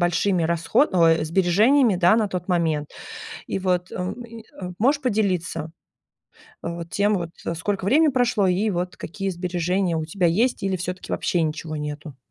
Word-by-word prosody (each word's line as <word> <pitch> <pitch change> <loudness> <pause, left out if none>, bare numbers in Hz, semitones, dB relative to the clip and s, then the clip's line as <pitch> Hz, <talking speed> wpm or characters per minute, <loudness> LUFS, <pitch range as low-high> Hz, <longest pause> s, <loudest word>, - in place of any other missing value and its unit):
большими 175 +1 +2
расхо 170 - +2
ой, 165 -3 +4
сбережениями 195 - +3
да 175 +4 +5
на 215 -3 +1
тот 180 -1 -5
момент. 160 -5 0 0.6
И - - -2
вот, 180 -1 0
эм, 185 +7 -4
и, 230 -1 -11 0.2
а, 180 -1 -5
можешь 275 +6 +3
поделиться 185 - -1 0.9
вот 170 0 -5
тем 205 +1 +2
вот, 170 -3 -2 0.3
сколько 195 +3 -2
времени 300 +9 +4
прошло 245 -6 +2
и 195 +4 +1
вот 180 -1 -3
какие 195 +3 -5
сбережения 180 0 -1
у 160 - -2
тебя 175 +3 0
есть 220 +10 +1
или 195 -1 0
всё-таки 180 +1 -5
вообще 175 - 0
ничего 155 0 -3
нету? 150 -1 -6
180 Hz, 160 wpm, -23 LUFS, 170-205 Hz, 0.9 s, да